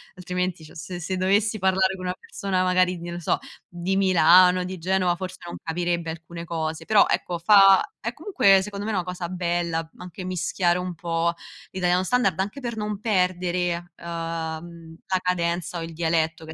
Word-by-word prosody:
altrimenti 180 -1 -3
cioè - - -15
s 180 +2 -7
se 185 +2 -3
dovessi 205 +3 +1
parlare 190 0 +2
con 185 - -7
una 180 0 -2
persona 190 -2 -2
magari, 185 0 +2
non 170 0 -6
lo - - -5
so, 170 - 0 0.3
di 175 +2 -2
Milano, 180 0 +5
di 185 +1 -5
Genova, 185 0 +1
forse 185 -1 -5
non 170 - -6
capirebbe 170 0 -2
alcune 170 +1 -8
cose, 160 -1 -3
però 210 -2 +5
ecco 175 -1 -1
fa 195 +2 +7 0.2
è 235 - -4
comunque 250 - +3
secondo 200 +1 -6
me 220 - -2
una 185 -4 0
cosa 180 -1 -5
bella 170 -2 -2
anche 180 +1 -9
mischiare 180 0 0
un 180 -1 -4
po' 170 0 -1 0.4
l'italiano 180 0 +1
standard 195 -5 +1
anche 205 +8 -3
per 235 -3 -4
non 210 -1 -3
perdere, 180 -3 0
uhm, - - -20 1.1
la 185 - +1
cadenza 175 -1 -1
o - - -4
il 165 0 -7
dialetto 160 -1 0
che 160 - -9
è - - -7
180 Hz, 180 wpm, -24 LUFS, 170-190 Hz, 1.1 s, fa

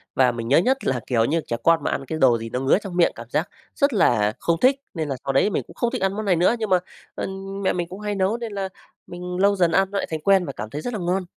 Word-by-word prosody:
Và 130 -1 +4
mình 115 -1 -5
nhớ 135 - +4
nhất 260 +10 +3
là, 130 -2 +1
kiểu, 115 -3 +2
như 160 +4 0
trẻ 115 - -2
con 165 0 +4
mà - - 0
ăn 135 - -3
cái 160 +4 -4
đồ 125 -3 +5
gì 115 0 -6
nó 125 - -2
ngứa 135 +6 +3
trong 190 -4 -7
miệng 170 - +4
cảm 115 +1 -10
giác 155 +7 -1 0.3
rất 280 -2 +2
là 110 - +3
không 165 -1 0
thích. 265 +2 +5 0.2
Nên 160 -4 -3
là 135 - -1
sau 135 - 0
đấy 170 +10 +3
mình - - -1
cũng - - -13
không 240 -1 0
thích 255 - -3
ăn 195 0 +1
món 215 0 -3
này 185 -3 +3
nữa 180 +7 +3
nhưng 220 - -2
mà, 185 -1 +4 0.4
ơ, - - -3 0.3
mẹ 190 - +1
mình 175 -1 -2
cũng 190 +2 -8
hay 210 -1 -3
nấu 195 +4 +1
nên 230 -2 -6
là 195 -1 -3 0.4
mình 180 0 -6
lâu 200 +1 +4
dần 175 -3 +2
ăn 195 +3 +2
nó 200 - -2
lại - - -1
thành 160 -1 -3
quen 195 -1 +4
và 140 - -5
cảm 110 - -6
thấy 150 +5 -5
rất 245 - -4
là 215 - -3
ngon. 180 +2 0
175 Hz, 315 wpm, -23 LUFS, 135-200 Hz, 0.4 s, đồ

